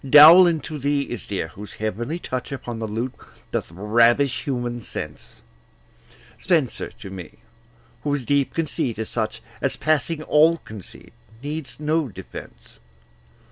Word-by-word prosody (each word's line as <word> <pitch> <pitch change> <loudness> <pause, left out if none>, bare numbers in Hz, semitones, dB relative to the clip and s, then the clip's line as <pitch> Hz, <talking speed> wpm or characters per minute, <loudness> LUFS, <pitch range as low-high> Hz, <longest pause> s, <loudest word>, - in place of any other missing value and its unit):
Dowland 155 +3 +9
to 155 -2 -6
thee 140 +1 +1
is 120 -6 -6
dear, 95 -5 -2
whose 100 +5 -10
heavenly 115 - -3
touch 130 -7 -4
Upon 120 -4 -5
the 110 - -3
lute 115 +4 -3 0.4
doth - - -2
ravish 115 - +3
human 120 -4 -2
sense; - - -7 1.0
Spenser 160 -9 +1
to 95 - -8
me, 90 -4 -8 0.7
whose 145 -3 -1
deep 140 0 +1
conceit 140 -8 -1
is 110 0 -3
such 110 -1 -2 0.2
As, 135 - 0
passing 155 +1 0
all 160 +3 +5
conceit, 110 - -12 0.3
needs 150 0 -5
no 155 0 +1
defence. 65 - -11
130 Hz, 135 wpm, -23 LUFS, 110-150 Hz, 1.0 s, Dowland